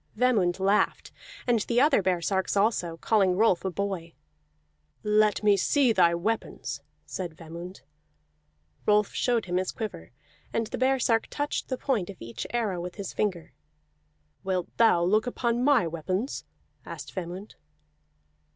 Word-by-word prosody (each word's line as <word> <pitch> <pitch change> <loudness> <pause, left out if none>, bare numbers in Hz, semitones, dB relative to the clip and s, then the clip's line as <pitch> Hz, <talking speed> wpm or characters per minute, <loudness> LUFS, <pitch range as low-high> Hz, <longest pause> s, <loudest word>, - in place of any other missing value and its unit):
Vemund 210 -8 +2
laughed, 195 +2 +1 0.3
and 240 -2 +3
the 235 +3 +1
other 280 -4 +4
baresarks 190 +2 0
also, 195 -5 +1
calling 195 0 +2
Rolf 215 -4 +3
a 190 - 0
boy. 185 -3 -4 0.9
"Let 210 0 +3
me 205 -1 +5
see 255 +5 +3
thy 170 -4 +4
weapons," 215 +6 -3 0.2
said 175 -4 -6
Vemund. 170 +3 -9 1.1
Rolf 210 0 +3
showed 240 -4 +1
him 180 0 -1
his 185 0 -1
quiver, 195 - -6 0.4
and 225 - 0
the - - -6
baresark 255 -3 +2
touched 290 0 -3
the 260 - -1
point 230 -11 -1
of 195 - -8
each 115 0 -6
arrow 215 -7 -1
with 180 0 -6
his 200 -3 -6
finger. 185 -6 -2 0.9
"Wilt 185 -2 -2
thou 225 -7 +5
look 215 +6 +2
upon 240 0 0
my 280 -7 +4
weapons?" 185 - -3 0.4
asked - - -8
Vemund. 185 +3 -6
200 Hz, 140 wpm, -27 LUFS, 180-230 Hz, 1.1 s, me